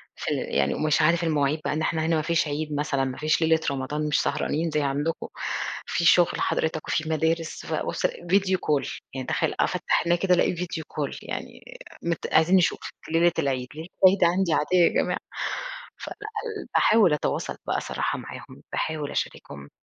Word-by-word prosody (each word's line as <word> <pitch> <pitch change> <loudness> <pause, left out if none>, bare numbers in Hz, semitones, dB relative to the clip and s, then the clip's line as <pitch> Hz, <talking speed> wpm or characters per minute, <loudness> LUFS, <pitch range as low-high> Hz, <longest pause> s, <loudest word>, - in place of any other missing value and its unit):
فال - - -2 0.2
يعني 70 0 +2
ومش 155 +1 +2
عارف 170 +2 +3
المواعيد 150 -1 +1
بقى - - 0
إن 155 - -1
إحنا 160 0 0
هنا 165 0 +2
ما 155 - +1
فيش 165 0 +1
عيد 150 +1 -3
مثلًا، 140 -2 0
ما 130 -1 -4
فيش 155 +2 +1
ليلة 160 0 +4
رمضان 145 +3 -2
مش 150 - +2
سهرانين 160 +1 -1
زي 150 - +1
عندكم، 145 +4 -1 0.6
في 170 - -1
شغل 175 +1 +5
حضرتك 160 -1 -1
وفي 160 0 -1
مدارس، 160 +1 -1
فأبُصّ - - -2
ألاقي 175 +3 +2
video 190 -1 0
call 150 -5 -1
يعني 130 -1 -5
تخيل - - 0
أفتَّح - - +1
عينيّا 170 0 +2
كده 185 -2 +3
ألاقي 175 - +2
video 170 -1 -4
call 145 -3 -3
يعني - - -7 0.3
آآ، - - -16
مت 170 - -2
"عايزين 160 +4 +5
نشوفِك 180 -2 +1 0.2
ليلة 170 +1 +4
العيد." 130 -2 -1
ليلة 160 +2 -7 0.2
العيد 185 0 +6
عندي 175 -1 +3
عادية 180 +5 +2
يا 175 - +6
جماعة! - - -1 0.8
فلأ، - - -7 0.5
ل - - -16
باحاول 215 -8 +5
أتواصل 150 - -1
بقى - - 0
صراحة - - -2
معاهم، - - -10
باحاول 155 -2 -2
أشاركهم، 70 0 -5
160 Hz, 180 wpm, -25 LUFS, 150-170 Hz, 0.8 s, العيد